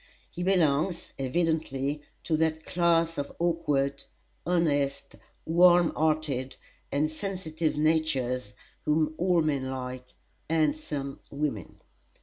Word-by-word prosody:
He 175 - -6
belongs, 170 -2 +1
evidently, 145 -1 0 0.2
to 160 - +1
that 160 0 0
class 165 -2 +2
of 140 - -3
awkward, 150 -5 0 0.4
honest, 145 -5 0 0.3
warm 175 0 +5
hearted, 155 -4 0 0.4
and 150 +2 +1
sensitive 160 -4 -3
natures 135 -8 +1 0.3
whom 155 +1 +2
all 175 -2 +3
men 140 -4 0
like, 125 -1 -6 0.3
and 160 - +3
some 140 - -5
women. 140 -7 -4
155 Hz, 105 wpm, -28 LUFS, 140-165 Hz, 0.4 s, warm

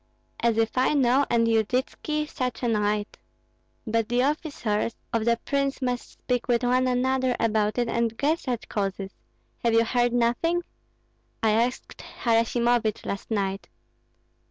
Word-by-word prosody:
"As 230 -1 +1
if 225 +2 +1
I 260 +3 +3
know, 270 0 +3
and 230 -1 +3
Yudytski 255 +7 0
such 255 -3 -4
a - - +2
knight!" 210 -1 0 0.7
"But 225 0 0
the 245 +1 +2
officers 260 -7 -1 0.2
of 225 -1 +1
the 235 0 +3
prince 275 -1 0
must 250 -2 -2
speak 250 -1 -2
with 240 -1 +2
one 255 +1 +2
another 255 0 +1
about 215 -1 +1
it 240 -1 +1
and 230 -1 -1
guess 310 +2 0
at 245 -3 -2
causes. 195 -1 -3 0.5
Have 235 -1 +2
you 230 0 +5
heard 245 +1 +1
nothing?" 245 +9 +1 0.8
"I 220 - +4
asked 235 +3 -1 0.2
Harasimovich 230 -1 +2
last 200 - -4
night." 195 -3 -2
235 Hz, 145 wpm, -26 LUFS, 225-255 Hz, 0.8 s, you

